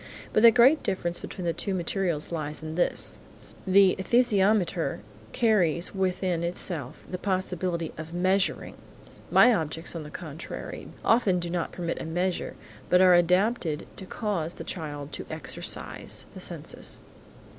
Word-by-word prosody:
But 215 - +4
the 235 - +10
great 250 +6 +5
difference 175 -3 -1
between 180 - -7
the 170 - +1
two 195 +3 -2
materials 175 -3 -1
lies 155 -2 -4
in 155 0 -5
this: 175 +2 0 0.5
The 190 0 +6
esthesiometer 200 - +2 0.3
carries 185 -8 +2
within 185 -2 0
itself 170 -5 -3
the 180 - -5
possibility 185 -3 -1
of 160 +1 -7
measuring; 185 +2 +1 0.6
my 250 - +7
objects 160 -2 -3
on 165 - -4
the 150 - -8
contrary, 160 0 -7 0.2
often 220 -6 +4
do 170 -1 -4
not 175 -1 -2
permit 170 -2 -3
a - - -5
measure, 175 +3 -2 0.3
but 180 - +5
are 185 -1 +7
adapted 175 -1 +2
to 190 - -9
cause 180 -8 -2
the - - -7
child 145 -4 -5
to - - -5
exercise - - -3
the - - -9
senses. - - -4
180 Hz, 145 wpm, -27 LUFS, 165-195 Hz, 0.6 s, the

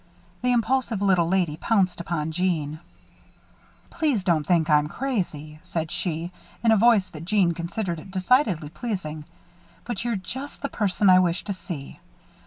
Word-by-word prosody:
The 250 - +2
impulsive 240 -2 +1
little 190 -4 +3
lady 175 -4 +1
pounced 190 -3 +1
upon 160 -2 -2
Jeanne. 160 -3 -1 1.1
"Please 290 - 0
don't 160 -5 +1
think 170 -3 +3
that 155 - +2
I'm 150 0 0
crazy," 155 - -3
said 160 -2 -4
she, 175 -1 -2 0.3
in 230 - +5
a - - +6
voice 215 -4 +4
that 160 -3 -8
Jeanne 190 -1 +3
considered 170 0 -4
decidedly 185 - +2
pleasing, 160 -7 -5 0.6
"but 240 -1 -3
you're 240 -2 0
just 260 +11 -6
the 280 - -1
person 205 -1 +1
I 185 -1 +8
wish 175 -1 +1
to 200 - -3
see. 170 -7 -8
185 Hz, 155 wpm, -25 LUFS, 165-220 Hz, 1.1 s, I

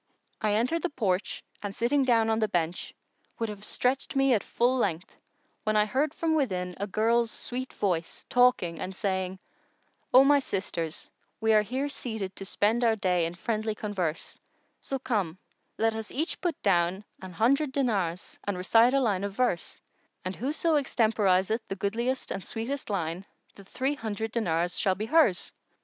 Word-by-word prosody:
I 210 -2 +2
entered 255 +10 +1
the 360 - -1
porch 200 - -1 0.2
and 200 -1 -5
sitting 270 +5 +2
down 230 -3 +3
on 220 - +1
the 215 - +2
bench, 175 -2 -2 0.5
would 230 -1 -2
have 210 -1 -7
stretcht 255 +6 -1
me 270 -1 +4
at 215 - +1
full 245 +2 +1
length 185 -8 -1 0.5
when 215 0 0
I 210 0 +5
heard 275 +7 0
from 325 -1 0
within 185 -12 0
a 200 - -2
girl's 230 +3 +2
sweet 255 +3 -4
voice 175 -5 -2
talking 245 -10 +3
and 185 +1 -5
saying:—O 190 +6 -1
my 285 +1 +5
sisters, 175 - -4 0.3
we 220 0 +3
are 215 - +6
here 260 +7 -2
seated 220 -9 -4
to 195 - -6
spend 220 +5 +1
our 225 -2 +4
day 180 -5 +1
in 170 - -7
friendly 220 +2 -2
converse; 185 -7 -3 0.4
so 270 - -3
come, 210 -10 -1 0.4
let 225 0 +2
us 220 -1 -5
each 315 +5 -2
put 345 -4 -1
down 185 0 +2 0.2
an 185 -1 -8
hundred 265 - +2
dinars 200 -11 -1
and 205 -2 -2
recite 225 +7 +4
a - - +4
line 200 -6 +1
of 200 -1 -3
verse; 240 -7 -1 0.5
and 185 +1 -3
whoso 300 +5 +1
extemporiseth 215 -5 +2
the 195 - -4
goodliest 235 +7 -1
and 195 - -3
sweetest 245 +5 -4
line, 175 -2 -2 0.3
the 200 - -14
three 265 +8 -1
hundred 220 -4 -4
dinars 175 -6 0
shall 190 -1 +2
be 210 +3 -3
hers." 225 - +3
220 Hz, 170 wpm, -28 LUFS, 190-250 Hz, 0.5 s, are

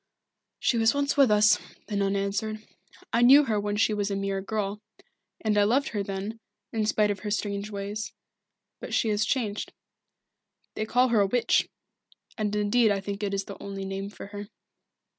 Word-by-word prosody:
"She 235 - +1
was 225 +4 +3
once 285 0 +1
with 275 -4 +5
us," 210 +1 +5 0.3
the 210 - -5
nun 200 0 +1
answered. 205 +2 -2 0.5
"I 235 - +3
knew 270 +5 +8
her 220 -6 0
when 205 0 -2
she 215 0 +2
was 205 -1 -1
a 200 - -1
mere 195 0 -2
girl 210 0 -3 0.6
and 215 -2 +1
I - - +5
loved 250 +7 +2
her 210 - -2
then, 200 +3 -5 0.3
in 220 -2 0
spite 210 -1 +2
of 200 - -4
her 210 - -5
strange 205 0 -2
ways. 205 +1 -4 0.7
But - - -4
she 225 - +2
has 210 0 +1
changed. 215 -6 -2 1.0
They 215 - -3
call 250 +3 +3
her 225 -3 +4
a 200 - +3
Witch 245 +4 +2 0.7
and 210 -2 -1
indeed 210 +2 +3
I 200 -1 +1
think 200 +1 -5
it 205 -1 -1
is 195 - -1
the 200 - -9
only 195 -1 -5
name 195 +1 -4
for 205 - -10
her." 205 0 -7
210 Hz, 190 wpm, -27 LUFS, 200-220 Hz, 1.0 s, knew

